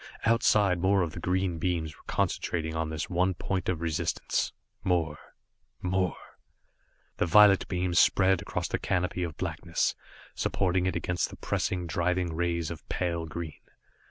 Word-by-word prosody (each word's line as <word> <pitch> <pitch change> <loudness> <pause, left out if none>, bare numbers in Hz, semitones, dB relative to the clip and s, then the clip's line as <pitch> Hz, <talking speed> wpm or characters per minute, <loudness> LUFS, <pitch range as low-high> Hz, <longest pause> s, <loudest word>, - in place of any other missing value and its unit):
Outside 105 -5 +4
more 95 0 +3
of 80 - -3
the 85 - -7
green 90 -1 0
beams 80 -3 -1
were - - -20
concentrating 80 -2 -1
on 80 -1 -1
this 80 -1 -3
one 90 0 +1
point 90 +1 -2
of 85 -3 -1
resistance. 80 -2 -1 0.3
More 80 -5 0 0.6
more 95 -1 0 1.0
The 90 - +1
violet 100 +2 +6
beam 90 -1 -1
spread 95 +1 +4
across - - -3
the - - -2
canopy 90 0 -1
of 80 -3 -3
blackness, - - -1 0.4
supporting 90 -1 0
it 95 - -1
against 90 -1 -1
the - - -11
pressing, 90 -2 -1
driving 85 0 0
rays 85 -1 -1
of - - -9
pale 85 -2 -1
green. 80 -1 -6
90 Hz, 150 wpm, -29 LUFS, 85-95 Hz, 1.0 s, violet